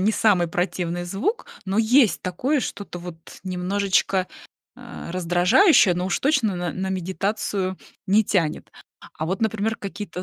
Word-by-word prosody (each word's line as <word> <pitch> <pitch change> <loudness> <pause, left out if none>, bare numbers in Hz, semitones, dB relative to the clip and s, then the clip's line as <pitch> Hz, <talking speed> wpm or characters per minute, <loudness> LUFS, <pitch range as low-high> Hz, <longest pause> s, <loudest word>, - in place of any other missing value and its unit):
не 210 +4 +2
самый 195 -7 +3
противный 175 0 -2
звук, 200 - -2 0.2
но 195 +3 -1
есть 235 +1 +4
такое 255 - 0
что-то 200 -5 -6
вот 175 -1 -8 0.3
немножечко, 190 0 0 0.5
а, - - -9
раздражающее, 180 - +4
но 180 +1 -2
уж - - 0
точно 270 -8 +2
н 175 +1 -4
на 190 - -2
медитацию 190 +1 -2 0.3
не 205 +3 +4
тянет. 170 -7 -1 0.5
А 155 - -2
вот, 190 +6 -2
например, 220 0 0
какие-то 200 -3 -6
190 Hz, 140 wpm, -23 LUFS, 180-215 Hz, 0.5 s, есть